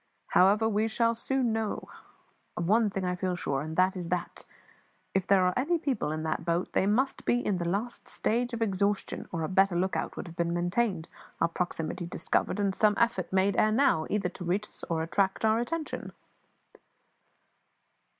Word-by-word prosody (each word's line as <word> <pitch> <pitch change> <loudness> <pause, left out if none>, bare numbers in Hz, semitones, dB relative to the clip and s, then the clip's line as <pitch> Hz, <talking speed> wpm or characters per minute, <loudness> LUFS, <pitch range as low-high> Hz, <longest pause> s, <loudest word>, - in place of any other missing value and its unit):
However, 205 +4 +4
we 215 0 +1
shall 230 +1 +2
soon 245 0 0
know 220 -2 -2
now. - - -14 0.7
Of 170 - -1
one 220 +2 +4
thing 195 -1 -3
I 180 0 0
feel 180 0 -1
sure, 140 -5 -2
and 155 +2 -6
that 185 +1 +3
is 175 -2 -5
that, 180 -1 -3 0.7
if 190 -1 0
there 190 -2 +5
are 180 - +2
any 310 +7 +1
people 270 - -1
in 155 0 -3
that 160 - -2
boat, 170 +1 -1
they 190 - +2
must 255 +6 +1
be 245 0 +1
in 190 -3 0
the 170 - -2
last 215 +6 -3
stage 240 +3 0
of 230 -1 -1
exhaustion, 200 -1 -1
or 165 -2 -2
a - - -1
better 190 0 +3
lookout 185 +2 -1
would - - -5
have 170 -2 -10
been 170 0 0
maintained, 175 0 0 0.3
our - - +2
proximity 175 0 -3
discovered, 185 - -1
and 200 -1 +1
some 210 +1 +3
effort 230 -6 +1
made 190 +1 +2
ere 215 - +4
now, 215 - +3
either 200 -3 0
to 180 - -9
reach 190 +4 -1
us - - -13
or 165 -1 0
to - - 0
attract 190 +5 0
our 220 +1 +3
attention." 310 +6 -4
195 Hz, 195 wpm, -29 LUFS, 175-225 Hz, 0.7 s, there